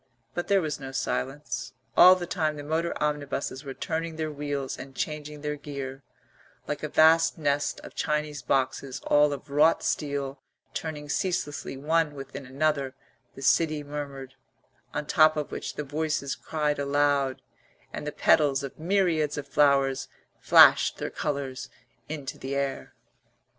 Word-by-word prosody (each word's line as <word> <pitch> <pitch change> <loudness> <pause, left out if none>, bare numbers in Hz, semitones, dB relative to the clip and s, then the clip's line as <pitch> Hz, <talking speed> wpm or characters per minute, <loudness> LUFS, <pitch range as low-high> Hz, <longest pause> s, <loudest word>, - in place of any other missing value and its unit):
But 175 - -3
there 195 -2 +3
was 150 -2 -3
no 135 -1 -7
silence; 130 -2 -3 0.2
all 185 +1 +9
the 180 -1 -4
time 155 -4 -1
the 145 - -6
motor 160 +3 -1
omnibuses 145 -2 -2
were 135 -2 -7
turning 165 0 -3
their 155 -1 -3
wheels 145 -2 -3
and 135 0 -9
changing 150 -1 -4
their 150 0 -2
gear; 140 -2 -6 0.7
like - - -3
a - - -3
vast 160 +1 +5
nest 145 -2 0
of - - -11
Chinese 150 -2 -1
boxes 130 0 -1
all 145 0 +4
of 140 0 -7
wrought 150 +3 +4
steel 140 -2 -2 0.3
turning 150 -2 -5
ceaselessly 150 -4 -2
one 155 +1 +1
within 135 0 -8
another 140 -1 0 0.4
the 135 - -9
city 155 +1 +3
murmured; 140 -2 -6 0.6
on - - -2
the - - -20
top 155 0 +5
of 150 - -3
which - - -5
the 150 - -3
voices 150 -1 -2
cried 150 -2 -2
aloud 140 -1 +1 0.5
and 150 - -5
the - - -1
petals 140 -2 +3
of 140 - -7
myriads 165 -4 +1
of 145 -1 -5
flowers 140 -1 +3 0.3
flashed - - +6
their - - -4
colours 135 -3 -3 0.4
into 145 -4 -5
the 135 +1 -4
air. 140 -1 -3
145 Hz, 155 wpm, -27 LUFS, 140-155 Hz, 0.7 s, all